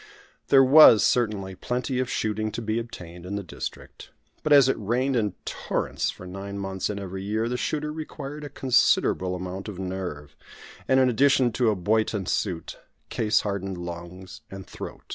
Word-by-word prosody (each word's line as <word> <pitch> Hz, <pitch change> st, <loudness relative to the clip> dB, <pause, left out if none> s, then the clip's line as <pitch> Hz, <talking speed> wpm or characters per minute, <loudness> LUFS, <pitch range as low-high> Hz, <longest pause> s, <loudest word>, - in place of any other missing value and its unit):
There 135 Hz, -1 st, +6 dB
was, 135 Hz, -5 st, +8 dB
certainly, 105 Hz, -6 st, 0 dB
plenty 125 Hz, +6 st, -3 dB
of 130 Hz, -1 st, -1 dB
shooting 110 Hz, -2 st, -1 dB
to 120 Hz, -, -4 dB
be 110 Hz, +1 st, -1 dB
obtained 90 Hz, -7 st, -9 dB
in 95 Hz, +3 st, -5 dB
the 100 Hz, -, -3 dB
district; 90 Hz, -, -8 dB, 0.3 s
but, 155 Hz, -, -2 dB
as 140 Hz, -3 st, +8 dB
it 135 Hz, -, +2 dB
rained 125 Hz, +6 st, 0 dB
in 105 Hz, -5 st, 0 dB
torrents -, -, -2 dB
for 90 Hz, -, -8 dB
nine 95 Hz, +2 st, -7 dB
months 95 Hz, -1 st, -3 dB
in 105 Hz, -, -3 dB
every 95 Hz, -1 st, -6 dB
year, 110 Hz, +3 st, -1 dB
the 125 Hz, -, -2 dB
shooter 150 Hz, +6 st, -2 dB
required 150 Hz, -1 st, -7 dB
a 145 Hz, -, -6 dB
considerable 95 Hz, -8 st, +2 dB
amount 90 Hz, +2 st, -6 dB
of 105 Hz, -4 st, -7 dB
nerve, 90 Hz, -6 st, -5 dB, 0.5 s
and, 130 Hz, 0 st, +4 dB
in 130 Hz, -, +5 dB
addition 130 Hz, 0 st, +3 dB
to 120 Hz, 0 st, +2 dB
a 105 Hz, -, +1 dB
Boyton 105 Hz, +1 st, 0 dB
suit, 90 Hz, -3 st, -3 dB, 0.3 s
case 110 Hz, -2 st, +1 dB
hardened 95 Hz, -2 st, -3 dB
lungs 85 Hz, +1 st, -8 dB
and 95 Hz, -1 st, -9 dB
throat. -, -, -9 dB
105 Hz, 175 wpm, -25 LUFS, 95-125 Hz, 0.5 s, was